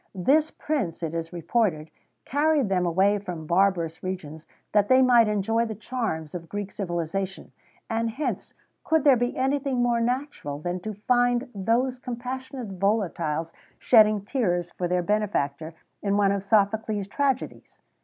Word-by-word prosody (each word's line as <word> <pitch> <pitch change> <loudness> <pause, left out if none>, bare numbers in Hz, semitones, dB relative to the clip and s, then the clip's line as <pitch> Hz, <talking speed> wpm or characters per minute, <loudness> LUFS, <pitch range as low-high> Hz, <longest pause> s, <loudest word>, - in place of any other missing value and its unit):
[XVII - - -7
103] 265 - +4
This 315 0 +1
Prince, 210 - -2
it 160 -1 -2
is 165 0 -4
reported, 170 -2 -1 0.3
carried 290 -4 +2
them 180 -2 +1
away 195 +4 +3
from 175 -5 -6
barbarous 170 -2 +1
regions, 165 -4 -6 0.2
that 205 -1 +3
they 260 +2 +6
might 240 -3 +5
enjoy 210 +2 +1
the 220 - -5
charms 210 - -4
of 170 -2 -7
Greek 205 -1 -4
civilization; 190 0 -4 0.4
and 230 -1 -1
hence 275 +7 -4 0.3
could 320 -2 +2
there 280 -3 +7
be 245 0 -1
anything 265 -1 0
more 240 -1 +2
natural 245 - -2
than 175 +4 -3
to 215 +3 -6
find 245 +3 +1
those 235 +6 0
compassionate 250 -4 -6
volatiles 170 -6 0 0.2
shedding 215 -3 +4
tears 175 -9 -1
for 180 - -3
their 180 0 0
benefactor, 165 -7 -1 0.3
in 200 0 +1
one 200 -1 +3
of 200 -1 -1
Sophocles' 210 0 +1
tragedies? 270 +3 -2
205 Hz, 155 wpm, -26 LUFS, 175-245 Hz, 0.4 s, there